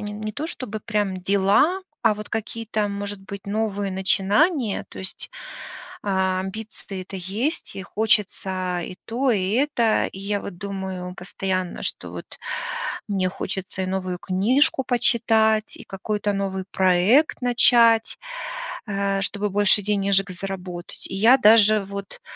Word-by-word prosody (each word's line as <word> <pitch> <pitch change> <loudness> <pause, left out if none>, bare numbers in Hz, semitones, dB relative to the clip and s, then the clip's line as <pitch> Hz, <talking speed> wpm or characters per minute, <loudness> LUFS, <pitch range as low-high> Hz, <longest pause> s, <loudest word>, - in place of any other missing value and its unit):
не 210 +1 -5
то, 300 +7 -4
чтобы 220 -9 -6
прям 205 -4 -1
дела, 200 - +3 0.2
а 220 -2 +4
вот 210 0 -8
какие-то, 220 -1 -2
может 200 0 -4
быть, 200 0 -9
новые 205 -1 -1
начинания, 205 - +2
то - - -11
есть 190 - -5 0.8
а 190 -1 +1
амбиции-то 205 +1 -7
это 185 +1 -6
есть, 215 - -2
и 195 - -4
хочется 190 -4 0
и 180 - -8
то, 255 +3 +1
и 195 -2 +1
это. 245 -4 +2
И 190 - -9
я 200 +1 -1
вот 175 -3 -8
думаю 190 -2 -5
постоянно, 185 0 -3
что - - -3
вот - - -7 0.8
мне 190 -3 0
хочется 190 0 -5
и - - -2
новую 185 -1 -2
книжку 255 - +2
почитать, 225 -3 +3
и - - -10
какой-то 205 +1 -2
новый 190 -1 -2
проект 190 - +3
начать, 235 -2 +4 0.7
э, 200 -1 0
чтобы 205 +1 -1
больше 205 +1 +4
денежек 200 -1 +2
заработать. 180 -1 -5
И - - -6
я 225 +7 +6
даже 215 -2 +6
вот 200 0 -7
200 Hz, 135 wpm, -23 LUFS, 190-220 Hz, 0.8 s, я